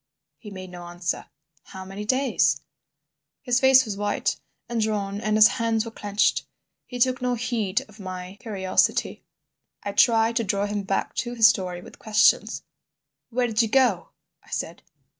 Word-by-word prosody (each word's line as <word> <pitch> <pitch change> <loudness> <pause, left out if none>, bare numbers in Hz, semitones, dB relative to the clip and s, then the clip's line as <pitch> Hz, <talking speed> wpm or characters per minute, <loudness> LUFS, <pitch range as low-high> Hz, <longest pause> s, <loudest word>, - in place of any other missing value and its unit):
He 215 - -10
made 185 -2 -9
no 175 -1 -9
answer. 175 0 -4 0.3
"How 190 0 -10
many 195 +2 -7
days?" 260 +3 +2 0.8
His 245 -1 +2
face 265 -1 +6
was 210 -3 -4
white 205 0 -1 0.3
and 235 -1 -2
drawn 205 -2 -2
and 215 -1 +1
his 215 0 +9
hands 225 -1 +1
were 230 - -7
clenched. 205 -1 0 0.4
He 250 - -7
took 255 +1 +2
no 250 -1 0
heed 225 -5 -1
of 215 0 -18
my 185 0 -7
curiosity. 190 -4 0 0.6
I 200 - -3
tried 225 +2 +3
to 230 - +1
draw 200 0 0
him 205 0 -2
back 195 0 -2
to 240 -1 -2
his 225 -2 +7
story 180 -3 -1
with - - -14
questions. 215 -1 +2 0.7
"Where 245 +1 0
did 225 -1 +1
you 225 - +1
go?" 235 -6 +2 0.3
I - - -21
said. - - -4
215 Hz, 165 wpm, -24 LUFS, 195-235 Hz, 0.8 s, his